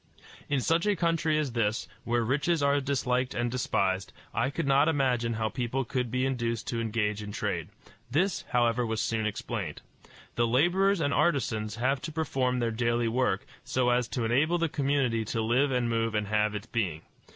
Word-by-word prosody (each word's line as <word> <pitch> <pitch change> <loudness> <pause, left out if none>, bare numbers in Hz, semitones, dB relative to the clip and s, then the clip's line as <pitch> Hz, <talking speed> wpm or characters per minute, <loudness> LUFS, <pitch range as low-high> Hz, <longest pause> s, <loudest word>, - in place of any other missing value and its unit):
In 140 -3 +1
such 165 +8 +1
a 205 - +3
country 165 -2 +1
as 150 -4 0
this, 110 -2 0 0.2
where 120 0 +1
riches 145 +6 +1
are 140 0 +3
disliked 130 -2 0
and 120 0 0
despised, 95 -6 0 0.2
I 120 +3 +1
could 155 +3 -3
not 140 +2 +4
imagine 125 -6 +1
how 110 0 -1
people 125 +2 -2
could 125 0 -2
be 125 +2 0
induced 120 -4 -1
to 115 -1 -1
engage 105 -2 -1
in 105 -1 -6
trade. - - -3 0.4
This, 175 +9 +1
however, 120 0 +2
was 110 -1 -2
soon 110 -1 0
explained. 105 - -4 0.5
The 120 0 +3
laborers 175 - +3
and 140 -2 +1
artisans 115 -9 +1
have 130 +3 0
to 160 - -5
perform 135 -5 0
their 120 -2 0
daily 120 0 +1
work, 115 -5 0 0.2
so 125 -1 +1
as 120 -1 +2
to 120 -2 -2
enable 145 +9 +2
the 165 -1 0
community 135 -6 +1
to 115 - -2
live 125 +6 +2
and 125 -2 +1
move 115 -1 0
and 105 0 +1
have 105 0 +1
its 105 - -5
being. 90 -9 -2
125 Hz, 185 wpm, -28 LUFS, 115-140 Hz, 0.5 s, not